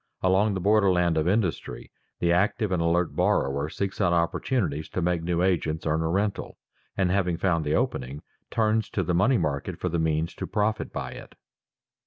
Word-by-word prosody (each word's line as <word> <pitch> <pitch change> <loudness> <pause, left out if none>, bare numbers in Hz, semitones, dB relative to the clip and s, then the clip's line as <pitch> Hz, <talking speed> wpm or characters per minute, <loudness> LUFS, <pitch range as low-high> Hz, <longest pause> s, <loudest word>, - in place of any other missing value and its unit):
Along 95 +3 +3
the - - -2
border 100 +1 +3
land 90 -2 +2
of 80 +1 +1
industry 95 -3 -1 0.3
the 85 - +1
active 100 +3 +1
and 90 -2 +1
alert 85 +1 +1
borrower 70 +2 +1
seeks 100 +4 -3
out 90 -3 +3
opportunities 85 - -1
to - - -3
make 85 -1 +1
new 85 +1 0
agents 80 -4 0
earn 80 0 +1
a 80 - -1
rental, 100 +3 -2 0.4
and 95 -2 +2
having 90 -3 +1
found 85 -3 +1
the 75 0 0
opening, 65 +3 -2 0.3
turns 110 -1 +1
to 95 - -1
the 90 - -1
money 115 +9 +3
market 75 -5 -2
for - - -1
the 85 - -1
means 80 +1 0
to - - -6
profit 110 0 -1
by - - -5
it. - - -11
90 Hz, 190 wpm, -26 LUFS, 80-100 Hz, 0.4 s, Along